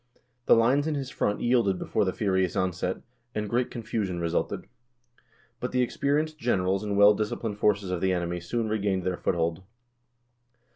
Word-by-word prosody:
The - - +7
lines 130 +6 +3
in 155 - 0
his 135 -2 -4
front 105 - -1
yielded 120 -6 +2
before 105 - 0
the 95 - +1
furious 95 -3 0
onset, 90 0 -1 0.3
and 105 0 -2
great 120 +4 0
confusion 110 -6 -3
resulted. 85 0 -1 0.9
But - - -4
the 125 0 +3
experienced 150 +5 -1
generals 95 -5 +1
and 100 -1 -2
well 100 +1 +8
dis 105 0 -1
ciplined 110 -3 -4
forces 100 -3 +1
of 90 -2 -2
the 95 - +2
enemy 90 -1 -1
soon 115 +6 -2
regained 100 -3 0
their 90 0 -1
foothold. 85 +1 -1
105 Hz, 165 wpm, -27 LUFS, 95-120 Hz, 0.9 s, well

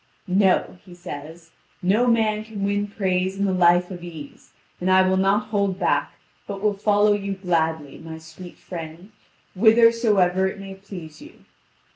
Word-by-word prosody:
"No," 185 -1 +1
he 180 -3 -14
says; 165 -1 -10 0.3
"no 210 +7 +2
man 220 -2 +2
can 215 -2 -7
win 205 +1 0
praise 190 -2 -1
in 200 0 0
a - - +1
life 175 0 +3
of 175 -2 -8
ease; 160 -5 -11 0.3
and 180 - -1
I 185 0 +5
will 190 - +2
not 200 +3 +1
hold 200 -3 0
back, - - 0 0.3
but 200 -1 -5
will 210 +1 +1
follow 205 +1 +3
you 200 -1 -2
gladly, 160 -6 -2
my 160 0 -9
sweet 160 +3 -12
friend, 170 +3 -9 0.4
whithersoever 220 -4 +4
it 190 - -6
may 195 0 -8
please 190 -5 -11
you. 305 +3 -15
190 Hz, 160 wpm, -23 LUFS, 175-205 Hz, 0.4 s, I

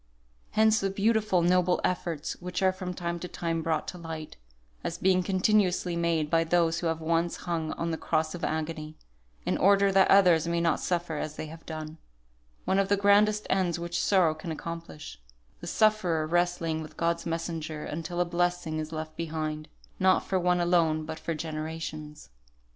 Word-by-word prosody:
Hence 220 0 +4
the 195 - 0
beautiful, 205 -2 +2
noble 180 0 +3
efforts 170 -4 -2
which 180 +1 -3
are 190 - +5
from 185 -1 -5
time 170 0 -3
to 180 - -5
time 165 -2 -2
brought 160 -1 -1
to 180 - -8
light, 160 -2 -7 0.5
as - - -3
being 185 -1 +3
continuously 185 -2 +2
made 170 -2 +1
by 165 +1 +2
those 170 0 +2
who 170 - -1
have 165 0 -1
once 165 +1 0
hung 165 -2 -2
on 170 0 -3
the 160 - -3
cross 155 0 0
of 175 - -7
agony, 155 0 -3 0.5
in - - 0
order 200 +1 +5
that 190 0 +4
others 175 -5 +5
may 170 0 0
not 165 -2 +1
suffer 175 -3 -2
as 155 0 -4
they - - -5
have 160 +1 -11
done; 155 0 -6 0.7
one 190 - +2
of 195 0 +1
the 200 - +3
grandest 205 +1 +4
ends 185 -3 +1
which 170 0 -2
sorrow 185 -6 +4
can 155 +1 -7
accomplish; 160 - -7 0.4
the - - -8
sufferer 190 -8 +2
wrestling 170 -1 0
with 155 0 -10
God's 170 0 0
messenger 165 -2 -4
until 165 +3 -4
a 175 - +3
blessing 175 -2 -1
is 155 0 -5
left 155 0 -5
behind, 155 -2 -4 0.3
not 185 0 +3
for 190 - 0
one 180 0 +2
alone 165 -3 +2
but 160 0 -6
for 165 - -3
generations. 155 - -6
170 Hz, 180 wpm, -28 LUFS, 160-180 Hz, 0.7 s, are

